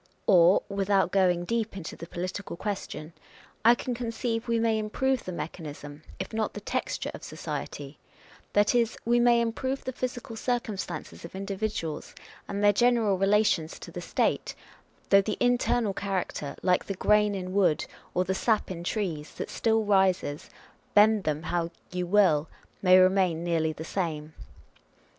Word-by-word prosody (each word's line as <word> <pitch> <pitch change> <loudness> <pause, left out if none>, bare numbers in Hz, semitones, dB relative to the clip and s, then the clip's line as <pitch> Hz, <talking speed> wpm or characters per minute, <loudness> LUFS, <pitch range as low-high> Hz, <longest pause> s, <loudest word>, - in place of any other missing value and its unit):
Or 180 -1 +6
(without 195 -1 +1
going 180 -3 +2
deep 225 -1 -2
into 165 -4 -6
the 170 - -9
political 185 +2 -5
question) 170 -6 -5 0.5
I 235 +2 +7
con 250 0 -4 0.2
ceive 225 0 -2
we 230 -1 +1
may 225 -1 +2
improve 260 +5 0
the 185 - -4
mechanism, 150 -3 -7 0.2
if 190 +3 -6
not 220 -1 -1
the - - -4
texture 205 - -3
of - - -9
society; - - -6 0.5
that 205 +2 +4
is, 235 -1 +1
we 240 +1 +3
may 240 0 +5
improve 260 +4 -2
the 260 - -3
physical 245 -2 -5
circum 235 -2 -1
stances 175 -5 -6
of 170 - -9
individuals 195 -5 -4 0.3
and 200 +1 -3
their 205 0 +6
general 225 -3 +3
relations 195 -5 +2
to - - -10
the - - -6
State, - - -1 0.5
though 195 0 +7
the 210 +1 -3
internal 245 -3 +2
character, 190 -7 -3
like 180 -1 +2
the 195 - -4
grain 210 +1 +3
in 185 -1 -5
wood, 190 -6 +2 0.3
or 180 - +3
the 185 +1 -1
sap 215 0 +1
in 170 -2 -5
trees, 175 -6 -3
that - - -5
still 225 -1 +1
rises, 190 -7 +1 0.5
bend 210 -1 +5
them 155 0 -1
how 170 -1 -1 0.2
you 180 -1 -2
will, 170 -6 +3 0.3
may 185 -1 +7
remain 185 -3 +3
nearly 165 -2 +1
the 155 - -7
same. 160 -5 -3
195 Hz, 160 wpm, -28 LUFS, 175-220 Hz, 0.5 s, I